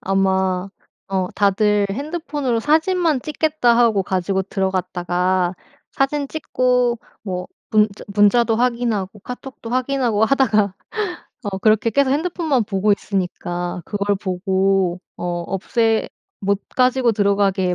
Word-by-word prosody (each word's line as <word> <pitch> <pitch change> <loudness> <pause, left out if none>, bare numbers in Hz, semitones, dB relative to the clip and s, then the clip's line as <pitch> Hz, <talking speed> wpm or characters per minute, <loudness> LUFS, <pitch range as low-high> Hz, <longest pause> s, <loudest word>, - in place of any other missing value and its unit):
아마 190 -1 +1 0.4
어 190 -2 -1
다들 205 0 +2
핸드폰으로 285 - -2
사진만 320 0 +2
찍겠다 305 -5 +1
하고 230 -5 +4
가지고 190 +1 -1
들어갔다가 185 -1 -1 0.4
사진 280 +1 0
찍고 250 -5 +1 0.2
뭐 180 -3 -4 0.2
문자 210 -1 +2
문자도 220 +2 +4
확인하고 235 -5 0
카톡도 250 -1 -8
확인하고 250 -4 +1
하다가 215 -7 +2 0.7
어 195 -2 -3
그렇게 215 +2 +3
계속 275 +3 +2
핸드폰만 310 -4 0
보고 205 0 +1
있으니까 180 -3 -3
그걸 205 -1 -1
보고 190 -1 0 0.2
어 - - -6 0.2
없애 225 +3 0 0.3
못 200 0 0 0.2
가지고 255 -2 +3
들어가게 200 -3 +1
210 Hz, 275 characters per minute, -20 LUFS, 190-250 Hz, 0.7 s, 하고